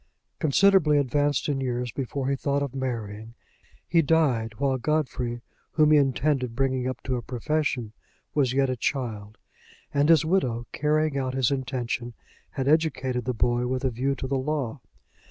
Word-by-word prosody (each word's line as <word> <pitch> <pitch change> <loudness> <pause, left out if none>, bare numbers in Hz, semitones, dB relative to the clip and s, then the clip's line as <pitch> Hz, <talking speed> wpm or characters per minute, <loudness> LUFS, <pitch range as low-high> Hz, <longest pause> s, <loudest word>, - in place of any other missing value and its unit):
Considerably 155 0 +4
advanced 145 0 +1
in 140 -2 -1
years 125 -2 -2
before 135 0 -3
he 140 - +1
thought 140 +1 0
of 140 -3 -4
marrying, 115 -4 -5 0.5
he 170 - +4
died 135 -8 +1
while 135 +1 0
Godfrey, 125 -4 -1 0.3
whom 155 -1 +4
he 155 - +7
intended 135 -2 0
bringing 130 -1 0
up 130 - -5
to 130 -1 -1
a - - -4
profession, 125 -1 -2 0.4
was 140 -4 +2
yet 135 +1 +2
a 130 - -1
child; 110 -5 -3 0.6
and 145 +2 +2
his 165 -1 +6
widow, 130 -10 0
carrying 150 -1 +1
out 130 -1 -2
his 130 -2 +2
intention, 125 -3 -3 0.3
had 135 -1 -3
educated 140 -6 +1
the 125 - 0
boy 120 +2 +1
with 130 +1 -2
a 130 - +1
view 135 +4 -1
to 135 - -5
the 135 0 0
law. 140 -2 -2
130 Hz, 165 wpm, -26 LUFS, 125-145 Hz, 0.6 s, he